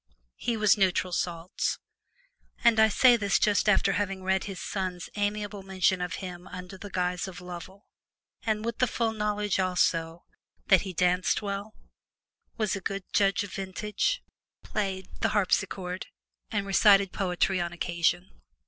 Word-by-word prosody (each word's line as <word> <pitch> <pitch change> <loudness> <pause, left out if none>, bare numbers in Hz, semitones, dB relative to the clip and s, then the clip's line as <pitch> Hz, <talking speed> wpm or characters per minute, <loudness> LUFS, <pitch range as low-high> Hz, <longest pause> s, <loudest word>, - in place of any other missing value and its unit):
He 235 -2 -1
was 215 -1 +4
neutral 185 -1 +2
salts; 170 0 -2 0.9
and 230 -2 +5
I 220 0 +6
say 245 +3 +6
this 200 -4 +2
just 210 0 +2
after 195 -1 +4
having 195 0 -2
read 190 0 +1
his 195 -2 -6
son's 185 -3 -4
amiable 205 0 -2
mention 190 -1 +1
of 180 0 -2
him 180 -1 -7
under 180 +1 -8
the 200 +2 -9
guise 180 0 -1
of 190 - -8
"Lovel," 180 +3 -9 0.6
and 215 -1 -1
with 235 -1 -3
the 255 - +4
full 230 0 0
knowledge 210 -2 -1
also 175 -2 0 0.4
that 190 -3 +7
"he 190 - -5
danced 180 +3 +2
well, 200 +2 -4 0.8
was 215 -3 0
a 195 - -5
good 195 +2 -3
judge 200 0 +3
of 200 - -8
vintage, 210 - -2 0.4
played 190 -3 -3
the - - +1
harpsichord, 185 -2 0 0.4
and 205 -2 -1
recited 195 -1 +5
poetry 185 -1 0
on 170 0 -2
occasion." 175 +1 0
195 Hz, 150 wpm, -28 LUFS, 180-205 Hz, 0.9 s, that